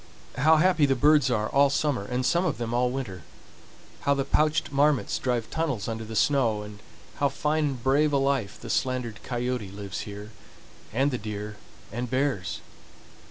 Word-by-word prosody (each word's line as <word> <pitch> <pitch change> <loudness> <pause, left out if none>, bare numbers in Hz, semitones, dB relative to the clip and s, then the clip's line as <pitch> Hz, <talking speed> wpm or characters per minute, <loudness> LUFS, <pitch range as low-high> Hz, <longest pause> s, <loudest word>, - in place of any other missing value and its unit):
How 155 +4 +6
happy 165 -3 +4
the 135 - +2
birds 145 0 +4
are 110 -3 +1
all 140 +3 +4
summer 140 -5 0
and 125 +3 -2
some 175 +4 +2
of 170 -6 -1
them 120 -1 -3
all 125 +1 +2
winter; 125 -9 -5 0.8
how 140 - +2
the 135 -1 -1
pouched 155 +1 +1
marmots 145 0 +2
drive 120 -3 -1
tunnels 140 -11 -2
under 115 0 -3
the 110 0 -7
snow, 115 -5 +2
and 105 -1 -10 0.4
how 140 -1 +2
fine 150 +2 0
and 135 -5 -3
brave 145 +3 +3
a 140 - +3
life 135 -7 0
the - - -6
slandered 125 -4 -1
coyote 125 -4 -3
lives 100 0 -6
here, 105 +1 -7 0.6
and 135 +6 +1
the 125 - -2
deer 105 0 -6 0.3
and 120 +3 -4
bears! 130 -7 -1
130 Hz, 175 wpm, -26 LUFS, 110-145 Hz, 0.8 s, How